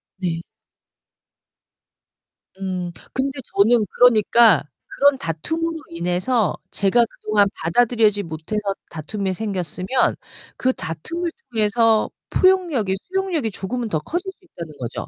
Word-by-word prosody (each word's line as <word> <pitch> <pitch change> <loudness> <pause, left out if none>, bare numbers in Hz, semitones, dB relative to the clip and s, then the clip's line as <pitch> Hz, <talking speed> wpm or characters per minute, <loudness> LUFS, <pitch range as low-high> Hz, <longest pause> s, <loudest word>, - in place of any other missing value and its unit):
네. 175 -3 -2 2.2
음 185 -2 -3 0.2
근데 275 +1 -2 0.2
저는 220 +2 +4
그러니까 230 - +5 0.2
그런 285 0 +3
다툼으로 320 - -2
인해서 180 +7 0 0.2
제가 200 +4 +3
그동안 215 -2 +1
받아들이지 215 +3 +2
못해서 165 +5 -4 0.3
다툼이 190 +5 -3
생겼으면 190 +3 -1 0.4
그 260 0 +1
다툼을 335 - -4 0.2
통해서 220 0 +3 0.2
포용력이 340 - +3
수용력이 365 - -1
조금은 225 +5 -4
더 160 - 0
커질 350 - -4
수 375 - -25
있다는 170 - -9
거죠. 120 -1 -5
215 Hz, 265 characters per minute, -22 LUFS, 180-260 Hz, 2.2 s, 그러니까